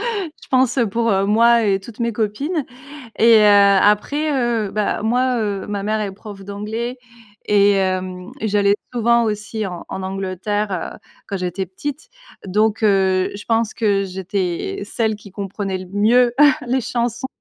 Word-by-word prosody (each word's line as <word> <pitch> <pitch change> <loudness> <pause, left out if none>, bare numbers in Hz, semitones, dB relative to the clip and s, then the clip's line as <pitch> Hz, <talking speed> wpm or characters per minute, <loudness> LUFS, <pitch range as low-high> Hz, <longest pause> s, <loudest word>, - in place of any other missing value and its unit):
je 350 -6 -7
pense, 255 -1 +2
heu, 235 -4 +3
pour, 230 +3 0
heu, 195 -2 +2
moi 230 +3 +4
et 195 -2 +2
toutes 215 +4 -13
mes 235 0 -1
copines 275 - -2 0.5
et 230 0 +6
heu, 200 -1 +6
après, 285 +9 +2
heu, 235 -6 0
bah, 210 -1 -1
moi, 245 +3 +1
heu, 200 -2 -2
ma 205 -1 -3
mère 215 +1 0
est 200 -2 -3
prof 200 0 -11
d'anglais 220 +5 -5 0.5
et 205 -1 +4
hem 185 -1 -2
et 220 - -2
j'allais 200 -1 +3 0.2
souvent 235 0 +3
aussi 215 0 -3
en 175 -2 -7
en 190 - -5
Angleterre, 195 +2 -3 0.2
heu, - - -14 0.3
quand 200 - -3
j'étais 185 +1 -3
petite 290 - -7 0.4
donc, 215 +3 +1
heu, 190 -2 +2
je 205 - -9
pense 225 -1 0
que 200 -3 +1
j'étais 185 - -3
celle 220 0 -1
qui 205 -2 -14
comprenait 195 -1 -4
le 185 - -9
mieux 235 +4 +3 0.3
les 255 +1 +1
chansons. 240 0 -2
210 Hz, 165 wpm, -20 LUFS, 195-235 Hz, 0.5 s, et